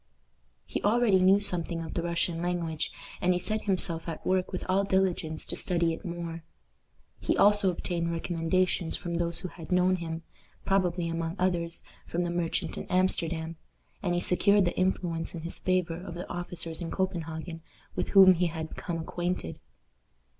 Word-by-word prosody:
He - - -3
already 215 -2 +4
knew 190 +2 +6
something 175 -4 0
of 160 - -6
the 170 - -1
Russian 170 0 -1
language, 170 -3 -1 0.3
and 180 +1 +4
he 180 - 0
set 215 +4 -1
himself 180 -4 0
at 160 - -6
work 185 -1 +1
with 185 - -4
all 190 +2 +3
diligence 185 -5 0
to - - -4
study 170 -2 +2
it - - -8
more. 170 -1 -5 0.8
He - - 0
also 205 -1 +6
obtained 170 -1 -2
recommendations 170 +1 0
from 175 - -5
those 170 0 0
who 185 - -4
had 165 -1 -11
known 180 +1 +4
him 165 -1 -5 0.4
probably, 180 -3 +1
among 165 0 -2
others, 175 -2 0 0.2
from 175 +1 -1
the 175 - -1
merchant 175 -1 -1
in - - -7
Amsterdam, 165 -3 0 0.4
and 175 -2 0
he 175 - +1
secured 200 +2 +4
the 175 - -1
influence 175 -3 -1
in 165 - -5
his 170 - -3
favor 180 -3 +1
of 175 -2 -7
the 175 - -5
officers 175 -1 -4
in 170 - -3
Copenhagen 165 -3 -3 0.3
with - - -1
whom 190 -2 +9
he 180 0 +1
had 160 -1 -4
become 170 -2 -4
acquainted. 175 - -3
175 Hz, 170 wpm, -29 LUFS, 165-185 Hz, 0.8 s, whom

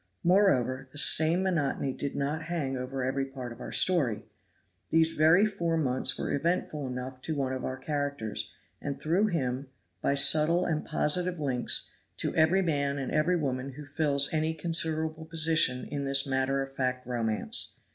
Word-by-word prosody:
Moreover, 135 - +2
the 145 - -13
same 160 +4 +6
monotony 145 -7 -1
did 140 +1 -4
not 150 +3 -2
hang 155 -6 -3
over 130 +1 -4
every 135 +2 -1
part 130 -3 -8
of 115 - -11
our - - -7
story. 145 - +2 0.7
These 160 0 +3
very 160 +7 +4
four 170 -6 -1
months 130 -4 +1
were - - -3
eventful 150 -2 -1
enough 130 +1 -6
to 160 - -4
one 135 -2 -2
of 130 - -5
our 130 - -4
characters; 140 -7 -4 0.3
and 140 -1 -5
through 175 +8 +1
him, 135 -7 -2 0.3
by 140 - +1
subtle 155 +5 +4
and 155 -2 -1
positive 175 +3 -1
links, 130 -5 -1 0.3
to - - -2
every 165 +4 +3
man 140 -4 -1
and 135 -2 -4
every 155 +4 +2
woman 135 -3 -3
who 150 +3 -10
fills 145 -1 +1
any 160 +1 0
considerable 160 -1 -2
position 160 -5 +3
in 140 -1 -4
this 135 0 +2
matter 135 0 0
of 135 0 -10
fact 125 -1 -2
romance. 115 -3 -1
145 Hz, 165 wpm, -28 LUFS, 130-160 Hz, 0.7 s, same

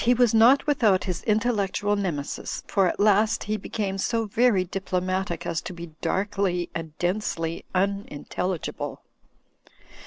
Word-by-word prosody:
HIBBS 245 -1 +4
99 225 - +5
not 255 +5 +6
without 225 -10 +3
his 180 -2 -3
intellectual 210 -2 +1
nemesis; 170 -8 -3
for 195 -2 +2
at - - -2
last 210 +1 +3
he 215 - -1
became 195 -1 -3
so 225 +3 0
very 220 -2 +3
diplomatic 185 -1 -2
as 165 -1 -1
to 180 - -7
be 170 -1 -9
darkly 195 -3 -1
and 160 -2 -6
densely 175 -3 -2
unintelligible. 190 -2 -2
195 Hz, 130 wpm, -25 LUFS, 180-215 Hz, -, not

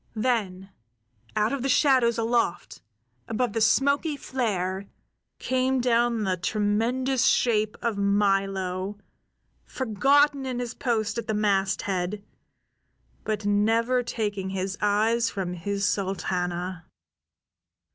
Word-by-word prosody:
Then 205 -5 -1 0.6
out 215 +3 +1
of 275 - -2
the 270 - -1
shadows 255 -4 +3
aloft, 230 - -1 0.5
above 225 0 -1
the 225 - -1
smoky 280 +7 +2
flare, 200 -8 -2 0.5
came 260 0 0
down 235 -2 +2
the 185 -2 0
tremendous 230 +7 0
shape 215 -3 +2
of 225 -4 -1
Milo, 195 -1 0 0.7
forgotten 275 +4 +2
in 255 -2 -3
his 245 -1 -4
post 225 -2 -1
at 230 - -6
the 220 - -1
masthead, 195 -1 0 1.0
but 215 -1 -3
never 225 +5 +2
taking 205 -5 -3
his 190 0 -3
eyes 220 +3 +2
from 190 -3 -4
his 200 +4 -2
Sultana. 180 -3 -2
215 Hz, 105 wpm, -26 LUFS, 195-240 Hz, 1.0 s, shadows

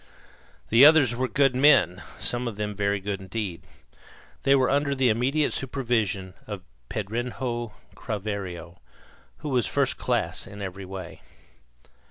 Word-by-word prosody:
The 115 +4 +6
others 145 -5 +7
were 130 +1 0
good 135 -1 +2
men, 130 - +5 0.2
some 120 0 0
of 115 - -4
them 105 0 -3
very 100 0 0
good 100 0 -3
indeed. 95 -2 -4 0.8
They 135 - +4
were 130 -2 +3
under 140 0 +1
the 130 -2 +3
immediate 135 +7 +1
supervision 115 -8 -1
of 100 -4 -6 0.3
Pedrinho 120 +2 -3 0.2
Craveiro, 95 -5 -5 0.6
who 150 - -6
was 125 -5 +1
first - - +1
class - - -1
in 100 - -10
every 95 0 -6
way. 95 -2 -8
115 Hz, 135 wpm, -26 LUFS, 100-130 Hz, 0.8 s, others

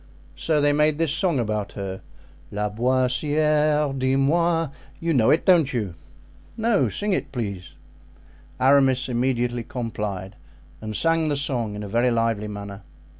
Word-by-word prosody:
So 155 -2 +1
they 145 0 +3
made 150 0 +2
this 165 -3 0
song 170 -2 +1
about 105 -4 -2
her: 95 -2 -5 0.5
'Laboissiere, 135 +7 +1
dis 130 0 +1
moi.' 165 +3 +2 0.3
You 165 0 0
know 115 -5 +3
it, 160 - +3
don't 170 -7 +4
you?" 105 -8 -2 0.6
"No, 225 -2 +2
sing 205 -1 -2
it, 140 -4 -2
please." 100 -8 -5 0.9
Aramis 135 -1 +4
immediately 120 -1 0
complied, 105 -5 -5 0.5
and 110 -1 -5
sang 165 +2 +2
the 145 - 0
song 120 -7 -2
in 105 - -6
a - - -6
very 120 +5 +2
lively 115 -3 0
manner. 100 -1 -7
130 Hz, 140 wpm, -23 LUFS, 110-150 Hz, 0.9 s, don't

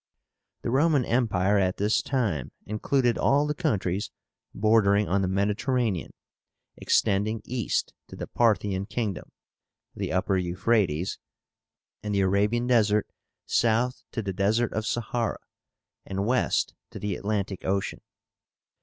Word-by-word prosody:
The - - -1
Roman 140 -1 +3
Empire 105 -5 +2
at 95 -1 +1
this 105 +2 +2
time 110 - -1
included 120 +3 +1
all 145 +2 +3
the 150 - -1
countries 105 - -1 0.4
bordering 105 -1 +3
on 100 +2 +1
the 95 - 0
Mediterranean, 105 - 0 0.7
extending 105 +3 +1
east 120 -4 -1
to - - -10
the - - -5
Parthian 100 -4 +1
kingdom 110 -3 -3 0.6
(the - - -3
Upper 95 +1 +1
Euphrátes) 90 -1 0 0.8
and 105 -1 -2
the 100 - +3
Arabian 105 +5 +2
Desert, 105 -4 +2 0.3
south 120 +2 +1
to 115 - -3
the 95 -1 -3
Desert 105 +5 +1
of 110 0 -2
Sahara, 120 0 -1 0.7
and 100 +1 -3
west 125 +3 +1 0.2
to - - -9
the 105 -2 -2
Atlantic 100 -2 -3
Ocean. 100 0 -1
105 Hz, 125 wpm, -26 LUFS, 100-120 Hz, 0.8 s, Roman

